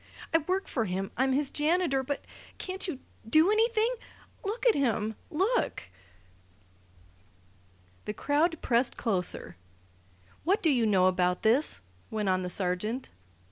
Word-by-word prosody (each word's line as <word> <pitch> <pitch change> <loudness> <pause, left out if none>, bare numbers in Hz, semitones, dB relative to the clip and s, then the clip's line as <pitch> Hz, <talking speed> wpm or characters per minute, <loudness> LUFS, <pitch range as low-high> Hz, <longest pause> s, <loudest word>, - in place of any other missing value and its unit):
"I 325 - +6
work 370 +5 -2
for 230 -4 -1
him. 190 0 -3
I'm 265 +2 +2
his 280 +1 0
janitor. 305 -2 +1
But 275 +2 -4 0.3
can't 380 +1 -3
you 330 -7 -3 0.3
do 315 - +5
anything? 450 +2 +2 0.5
Look 440 +5 -3
at 475 - +6
him! 220 -5 0 0.2
Look!" 390 +10 0 2.1
The 210 - -3
crowd 310 +3 +1
pressed 240 +1 +2
closer. 180 - 0 0.9
"What 380 +6 +1
do 320 - +4
you 240 -5 +2
know 190 -3 +4
about 180 -1 +1
this?" 220 - +2 0.3
went 210 -3 -1
on 185 0 +2
the 180 - -3
sergeant. 195 +7 -2
265 Hz, 135 wpm, -29 LUFS, 210-350 Hz, 2.1 s, I